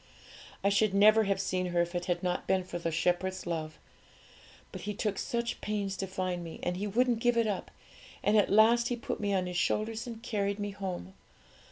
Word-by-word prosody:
I 200 - +4
should 200 0 +2
never 215 +2 +6
have 195 -1 0
seen 185 -1 -1
her 175 -1 +1
if 175 +1 -7
it 175 0 -2
had 175 0 -1
not 180 -1 -1
been 190 -1 +2
for 175 -1 -6
the 170 - -1
Shepherd's 180 +3 0
love; 160 -3 -3 0.9
but - - -7
He 210 0 -4
took 205 -1 -1
such 235 0 -2
pains 205 -2 -2
to 195 - -3
find 185 -2 -3
me, 165 -1 -8
and 175 - -1
He 200 +3 -3
wouldn't 240 +3 +2
give 240 0 +2
it 230 - +3
up, 205 -3 -2 0.5
and 205 - +3
at 210 - +4
last 230 +3 +5
He 245 - -1
put 235 - -4
me 205 -1 -1
on 190 -2 +1
His 180 -1 -3
shoulders 220 +5 0
and 230 -1 -8
carried 200 -3 -1
me 205 -1 -3
home. 190 -1 -5
195 Hz, 215 wpm, -30 LUFS, 180-215 Hz, 0.9 s, never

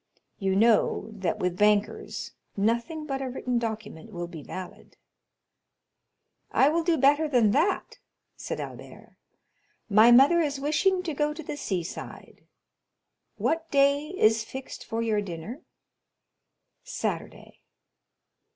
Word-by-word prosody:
You 195 -2 0
know 220 0 +3
that 195 -5 -2
with 180 0 -2
bankers 210 0 +1 0.3
nothing 235 +10 0
but 270 -2 -3
a 265 - -3
written 250 -1 -2
document 220 -4 -6
will 175 -3 -4
be 170 -3 -9
valid." 185 +5 -9 1.5
"I 270 - +4
will 330 +2 +1
do 335 -1 +2
better 290 +4 +4
than 240 -7 +3
that," 330 - 0 0.4
said - - -5
Albert; - - -10 0.7
"my 215 +3 +7
mother 275 +8 +7
is 290 -4 0
wishing 360 +6 +1
to 330 -4 -3
go 295 +1 -1
to 320 - -7
the 290 - -5
sea 190 -11 -2
side—what 325 - -7
day 280 +1 +3
is 220 - +4
fixed 265 +4 -8
for 225 +1 -2
your 215 -2 +1
dinner?" 200 - -7 1.2
"Saturday." - - -5
240 Hz, 125 wpm, -27 LUFS, 210-300 Hz, 1.5 s, my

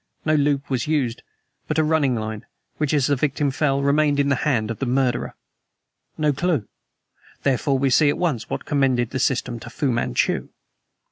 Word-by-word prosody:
No 155 - +2
loop 145 -2 +1
was 125 0 -1
used, 135 -7 0 0.5
but 155 - -1
a 160 - +4
running 155 -5 +2
line, 110 -1 -5 0.3
which, 150 -2 0
as 145 -4 +2
the 145 - +2
victim 140 +1 0
fell, 140 0 0
remained 145 0 +2
in 140 0 +2
the 140 - +2
hand 115 -5 0
of 115 - -6
the 135 - -2
murderer. 125 -1 0 0.8
No 150 -2 +2
clew! 145 - 0 0.8
Therefore 135 0 +1
we 135 0 +1
see 150 +2 +5
at 145 - 0
once 150 -11 -1
what - - -4
commended 130 -5 +1
the 130 - -2
system 120 -2 0
to 120 - -9
Fu 140 +1 -1
Manchu." 115 - 0
140 Hz, 185 wpm, -22 LUFS, 125-150 Hz, 0.8 s, see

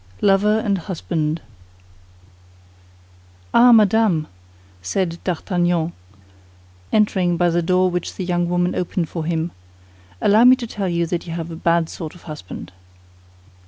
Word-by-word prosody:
LOVER 205 +2 +3
AND 200 -3 0
HUSBAND 165 -3 -3 2.1
Ah, 245 +1 +7
Madame," 215 -7 +4 0.6
said 170 - -2
D'Artagnan, 175 -2 -1 1.0
entering 190 -5 +2
by 175 0 +2
the 175 +1 +1
door 185 +2 +2
which 175 -1 -4
the 185 - -4
young 175 -1 0
woman 175 0 +1
opened 175 -2 -2
for 165 -3 -4
him, 165 0 -1 0.7
"allow 210 +3 +4
me 250 +1 +8
to 250 - -6
tell 200 -4 -3
you 170 0 0
that 170 +1 -4
you 165 - -5
have 165 0 -5
a - - -6
bad 170 0 +1
sort 160 -1 -8
of 175 - -16
a - - -20
husband." 150 - -8
175 Hz, 140 wpm, -20 LUFS, 165-195 Hz, 2.1 s, me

